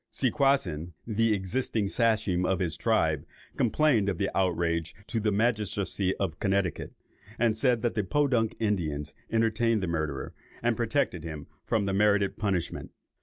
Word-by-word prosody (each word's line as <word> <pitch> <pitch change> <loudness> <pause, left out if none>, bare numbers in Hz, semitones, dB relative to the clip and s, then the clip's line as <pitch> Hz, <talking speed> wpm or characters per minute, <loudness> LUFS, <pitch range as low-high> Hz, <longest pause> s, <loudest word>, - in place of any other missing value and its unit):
Seaquassin, 125 - +1
the 115 0 +1
existing 105 +2 -1
Sachem 110 -5 +1
of 95 +1 +1
his 85 -4 -1
tribe, - - +1 0.3
complained 120 -4 +2
of 95 - -2
the 100 - -2
outrage 85 -3 0
to 115 - -2
the 105 0 +1
magistracy 105 -3 0
of 95 -4 -3
Connecticut, 95 -4 -1 0.4
and 115 -2 +2
said 120 0 +2
that 120 - +1
the 105 - 0
Podunk 120 0 +1
Indians 75 -9 -1 0.2
entertained 115 -1 +2
the - - -1
murderer, 80 -5 -3 0.3
and 120 -1 +2
protected 115 - 0
him 80 -3 -6 0.2
from 110 -3 +1
the 100 - -1
merited 100 0 +2
punishment. 95 -5 -2
105 Hz, 145 wpm, -28 LUFS, 90-115 Hz, 0.4 s, complained